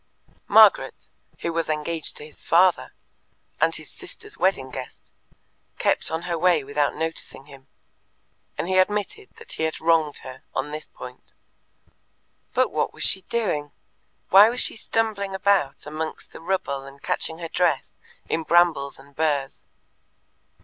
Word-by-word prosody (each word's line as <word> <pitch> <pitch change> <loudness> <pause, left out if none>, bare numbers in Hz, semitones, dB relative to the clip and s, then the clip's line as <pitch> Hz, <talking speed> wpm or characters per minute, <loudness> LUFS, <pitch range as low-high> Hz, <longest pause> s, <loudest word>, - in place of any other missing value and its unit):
Margaret, - - +5 0.3
who 170 - -2
was 165 -1 -1
engaged 155 +1 -2
to - - -8
his 150 - -11
father, 180 +2 +3 0.7
and - - +3
his - - -7
sister's 425 -2 -10
wedding 135 -9 0
guest, 130 0 -9 0.7
kept - - +1
on 160 +1 -3
her 170 -2 -2
way 175 -4 +3
without 145 +1 0
noticing 160 -4 -4
him, 135 -2 -15 0.9
and - - -2
he 185 0 +3
admitted 210 - 0
that 460 0 -12
he - - -3
had 160 0 -1
wronged 160 -2 +2
her 130 -1 -9
on 140 +2 -2
this 155 +1 -6
point. 125 0 -12 1.2
But - - +3
what - - -1
was - - -3
she 190 - +3
doing? 165 -11 -1 0.6
Why 200 +3 +8
was 245 +2 +1
she - - +4
stumbling 215 -3 -1
about 190 -7 +1
amongst 155 +1 -5
the - - -10
rubble 165 -6 -2
and 140 0 -12
catching 160 +3 -2
her 170 -1 -5
dress 165 -4 0 0.3
in 165 - 0
brambles 160 -4 +3
and 140 +1 -18
burrs? 145 -4 -1
160 Hz, 150 wpm, -24 LUFS, 145-190 Hz, 1.2 s, Why